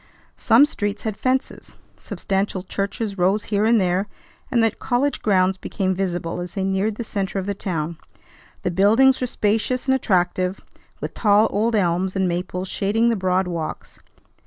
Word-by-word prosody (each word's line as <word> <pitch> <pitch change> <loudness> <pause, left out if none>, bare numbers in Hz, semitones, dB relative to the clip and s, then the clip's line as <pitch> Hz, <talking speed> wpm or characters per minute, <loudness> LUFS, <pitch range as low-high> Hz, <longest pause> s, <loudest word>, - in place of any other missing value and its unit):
Some 235 +6 +5
streets 205 -7 -3
had 220 -2 -2
fences. 260 +4 -2 0.2
Substantial 195 -1 -3
churches 200 +1 -3
rose 195 +4 +2
here 205 0 0
and 230 0 +4
there, 185 +1 0 0.4
and 235 -2 +2
the 225 - +3
college 260 +7 -1
grounds 190 -2 +2
became 190 -1 -1
visible 175 -2 -3
as 175 - -7
they 195 - -1
neared 195 +3 0
the 235 - -4
centre 200 -3 -3
of 190 - -2
the 200 - -1
town. 170 -4 -4 0.6
The 180 - 0
buildings 225 +9 +4
were 250 - 0
spacious 225 +3 0
and 265 - +3
attractive, 185 -5 0 0.4
with - - -4
tall 210 0 +4
old 225 +3 +1
elms 185 -1 +1
and 190 -1 +1
maples 180 +1 -3
shading 215 +5 +1
the 230 - +2
broad 185 -1 0
walks. 165 -3 -5
195 Hz, 165 wpm, -22 LUFS, 185-220 Hz, 0.6 s, Some